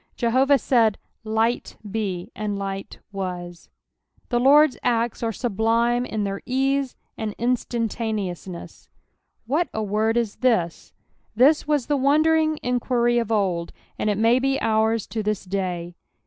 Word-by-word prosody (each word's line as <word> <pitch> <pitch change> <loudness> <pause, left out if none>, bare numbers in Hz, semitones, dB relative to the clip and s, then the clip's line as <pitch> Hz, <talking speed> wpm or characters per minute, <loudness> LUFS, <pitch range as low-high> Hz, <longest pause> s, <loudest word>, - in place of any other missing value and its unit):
Jehoviih 260 +4 +3
aaid, 225 -5 +4 0.3
"Light 225 +2 -1
be," 200 -2 -3
and 210 -1 -3
light 195 0 -5
waa. 180 -3 -4 0.8
The 240 - +1
XiOrd's 285 +3 +6
acts 235 -1 0
arc 225 -2 -2
mhlitne 235 +2 +1
in 215 -1 -2
their 195 0 -3
ease 270 +1 0 0.2
and 215 -2 -4
instaataneousncss. 220 -7 -3 0.6
"What 295 +6 0
a 220 - -1
word 215 +3 +1
is 230 -3 -1
this)" 220 -10 0 0.4
This 285 +7 +4
was 295 -5 +1
the 290 - +1
wondering 310 +3 +3
enijuiry 240 -1 +1
of 230 -1 -5
old, 185 -6 0 0.3
and 215 - 0
it 205 - 0
may 230 +3 +4
be 270 +1 0
ours 220 -1 +1
to 225 - -4
this 210 -2 -2
day. 180 -2 -3
225 Hz, 135 wpm, -23 LUFS, 205-250 Hz, 0.8 s, XiOrd's